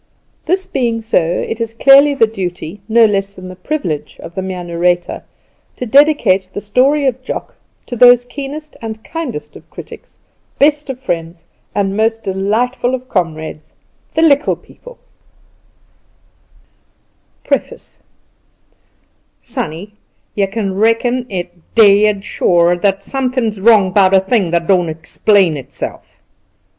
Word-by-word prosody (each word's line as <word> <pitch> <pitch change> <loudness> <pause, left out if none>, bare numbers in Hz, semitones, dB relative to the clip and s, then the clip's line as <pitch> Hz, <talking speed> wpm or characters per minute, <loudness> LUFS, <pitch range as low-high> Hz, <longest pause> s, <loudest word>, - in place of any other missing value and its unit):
That 375 +3 0
being 235 -3 0
so, 220 -4 +2 0.3
it 225 - -4
is 225 0 -4
clearly 280 +3 +6
the 230 - +4
duty, 190 -3 -6
no 230 +1 +5
less 200 -1 -1
than 185 0 -10
the 185 - -9
privilege, 175 - -4
of 170 - -10
the 190 - -3
Mere 185 -1 -5
Narrator 175 +1 -1 0.5
to 250 - -5
Dedicate 230 -8 +3
The - - -5
Story 260 +8 +2
of 260 -1 -1
Jock - - -6 0.3
to 245 - -6
Those 245 0 +6
Keenest 285 +4 -8
and 220 -1 -7
Kindest 245 - -6
of - - -15
Critics, - - -12 0.4
Best 295 0 +2
of 260 -1 -5
Friends, 165 -8 -4 0.3
and 195 -1 0
Most 225 +1 0
Delightful 225 +7 -1
of 255 0 -10
Comrades 160 -4 -3 0.4
The 320 - +2
Likkle 285 -3 +3
People - - -15 2.5
PREFACE 485 - -3 1.4
"Sonny, 205 - -6 0.4
you 200 -1 0
kin 195 -1 -3
reckon 240 +3 +1
it 175 -2 -7
dead 205 -2 +4
sure, 175 0 +2
thar's 195 +2 0
something 255 -1 -1
wrong 210 -5 +5
'bout 195 0 +4
a - - +7
thing 190 -1 0
that 170 0 0
don't 180 -2 +2
explain 165 +3 +1
itself." 135 -3 -8
210 Hz, 130 wpm, -15 LUFS, 185-250 Hz, 2.5 s, a